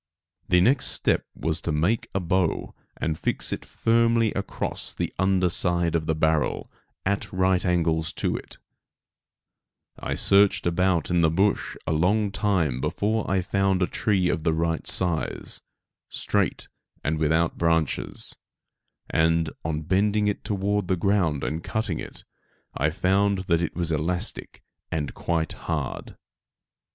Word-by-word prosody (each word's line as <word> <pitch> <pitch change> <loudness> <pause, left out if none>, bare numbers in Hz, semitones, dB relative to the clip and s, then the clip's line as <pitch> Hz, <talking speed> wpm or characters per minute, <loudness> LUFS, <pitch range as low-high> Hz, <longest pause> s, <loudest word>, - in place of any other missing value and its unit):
The 90 -1 +5
next 125 +8 +3
step - - 0
was 80 +1 -2
to 85 - -2
make 85 +10 0
a - - +2
bow 90 -1 0 0.2
and 80 -1 -2
fix - - 0
it - - -5
firmly 115 -1 +2
across 100 - -3
the - - -3
under 95 -1 +3
side 85 -1 +2
of 80 -2 -1
the 80 - +1
barrel, 80 0 0 0.3
at 100 +1 -1
right 95 0 +2
angles 80 -3 +1
to - - -1
it, - - -8 1.4
I - - -3
searched 100 0 +4
about 85 -1 +1
in 90 -1 +3
the 80 - +4
bush 95 +6 +1
a - - -1
long 100 +6 +2
time 85 -12 0
before 110 +7 -1
I 95 -1 +1
found 95 0 +1
a - - +4
tree 95 -1 0
of 85 - 0
the 80 - +2
right 80 0 -1
size, 85 -4 -1 0.5
straight - - -1 0.4
and 75 +1 -1
without 80 +2 +1
branches; 80 -3 0 0.7
and, 80 0 +2
on 80 -1 -2
bending 105 +5 +2
it 105 - 0
down 105 - -2
toward 100 0 0
the 95 - +2
ground 85 -6 +1
and 80 +2 -3
cutting 110 -7 -2
it, - - -9 0.5
I 75 +3 +1
found 95 +4 +1
that 85 -2 +2
it 85 - -3
was 85 -2 -1
elastic 80 +4 -2 0.3
and 75 -3 -2
quite 80 -2 -1
hard. 75 -6 -4
90 Hz, 145 wpm, -25 LUFS, 80-100 Hz, 1.4 s, The